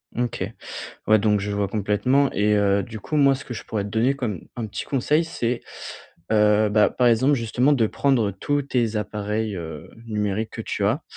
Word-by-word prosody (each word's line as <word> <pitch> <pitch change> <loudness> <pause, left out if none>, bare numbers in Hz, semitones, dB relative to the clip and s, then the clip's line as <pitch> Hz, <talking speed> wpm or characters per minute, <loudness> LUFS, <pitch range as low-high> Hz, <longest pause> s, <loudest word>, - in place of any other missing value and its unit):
OK, 120 -1 -2 0.6
ouais, 110 -1 +6
donc 105 -1 +2
je 105 +1 -3
vois 100 -1 0
complètement. 110 +7 +1
Et 105 +1 +2
heu, 100 -1 +2
du 110 +1 -8
coup, 155 +8 -3
moi 140 -1 +5
ce 135 - -9
que 120 - -7
je - - -7
pourrais 105 -2 -3
te 100 - -6
donner 120 +6 +1
comme, 110 - -4
un 115 -2 -3
petit - - -5
conseil 150 +4 +1
c'est, 120 -7 -2 0.7
heu, 105 0 +4
bah, 105 0 +4
par 125 -1 +2
exemple, 130 +5 +4
justement 125 +4 +2
de 115 -5 +2
prendre 120 -7 +1
tous 145 +9 -1
tes 120 -5 0
appareils, 105 0 -2
heu, 80 -1 -7 0.2
numériques 105 0 -2
que - - -6
tu - - -2
as - - 0
110 Hz, 200 wpm, -23 LUFS, 105-125 Hz, 0.7 s, ouais